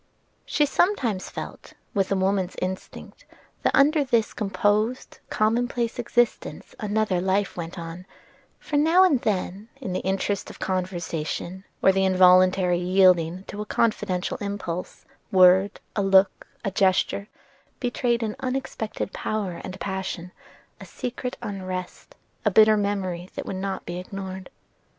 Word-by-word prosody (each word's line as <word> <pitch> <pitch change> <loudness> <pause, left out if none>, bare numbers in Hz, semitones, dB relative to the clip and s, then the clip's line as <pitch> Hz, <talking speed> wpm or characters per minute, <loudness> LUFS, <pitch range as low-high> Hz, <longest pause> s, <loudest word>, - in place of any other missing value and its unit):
She 295 - +2
sometimes 275 - +1
felt - - -8 0.2
with 195 -1 0
a - - +3
woman's 190 -1 0
instinct 185 +1 -6 0.4
that - - +2
under 295 +2 +5
this 235 -5 +1
composed, 210 +3 0
commonplace 235 +2 0
existence 240 -1 -1
another 210 -4 0
life 190 +2 0
went 170 +1 -6
on; 170 +2 -7 0.5
for, 295 - -2
now 325 +5 +5
and 295 -10 +3
then, 200 +1 -2
in 195 -9 -4
the - - 0
interest 195 +1 -1
of - - -11
conversation, 180 0 -3 0.2
or 195 - +7
the 190 0 +1
involuntary 185 -1 +5
yielding 180 -1 +3
to 205 +1 -7
a - - -4
confidential 210 -6 0
impulse, 200 -4 -5 0.3
a - - -5
word, 185 +2 +6 0.2
a 205 - +1
look, 195 0 +3 0.2
a 195 - 0
gesture, 195 +1 +1 0.5
betrayed 240 -1 0
an 215 -1 -2
unexpected 255 -6 -3
power 200 -5 -3
and 190 0 -7
passion, 190 -2 -4 0.5
a - - -9
secret 250 0 -5
unrest, 185 -2 -6 0.3
a - - +3
bitter 215 0 +6
memory 190 -4 -2
that - - -5
would - - -4
not 190 0 -4
be 175 +1 -4
ignored. 190 0 -7
195 Hz, 135 wpm, -25 LUFS, 185-220 Hz, 0.5 s, or